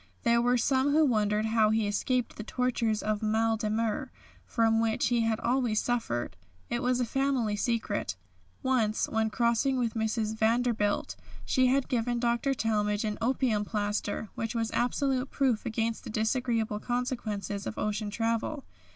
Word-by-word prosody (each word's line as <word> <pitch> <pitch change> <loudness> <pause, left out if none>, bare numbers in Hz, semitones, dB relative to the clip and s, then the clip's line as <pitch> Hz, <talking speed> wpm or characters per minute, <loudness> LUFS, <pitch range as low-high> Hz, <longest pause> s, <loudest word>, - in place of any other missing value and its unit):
There 235 0 +4
were 245 +1 +3
some 265 +3 +2
who 310 +1 +5
wondered 215 -4 +1
how 220 -1 +3
he 220 0 +2
escaped 240 +4 -1
the 215 - -6
tortures 230 -2 0
of 215 0 -1
mal 225 +1 +2
de 215 -1 -2
mer, 225 +4 -1 0.4
from 225 -1 +2
which 225 0 +1
he 240 -1 +2
had 225 -1 +1
always 240 -3 +1
suffered. 230 - -2 0.4
It 240 +1 0
was 250 -1 +1
a 250 - +1
family 260 -4 0
secret. 215 - -1 0.5
Once, 230 -5 +1
when 220 0 0
crossing 235 +4 +1
with 235 -3 0
Mrs. 220 -1 -1
Vanderbilt, 220 -2 +1 0.3
she 260 -1 +3
had 265 +1 +2
given 240 0 0
Dr. 240 +3 +1
Talmage 210 -2 0
an 210 -1 -3
opium 235 -3 +1
plaster, 210 0 -2
which 225 +1 -4
was 225 -1 -1
absolute 260 +1 0
proof 255 -6 0
against 225 0 -2
the - - -8
disagreeable 220 -1 0
consequences 220 -5 -3
of - - -5
ocean 210 0 -2
travel. 230 +6 -2
225 Hz, 160 wpm, -29 LUFS, 215-245 Hz, 0.5 s, who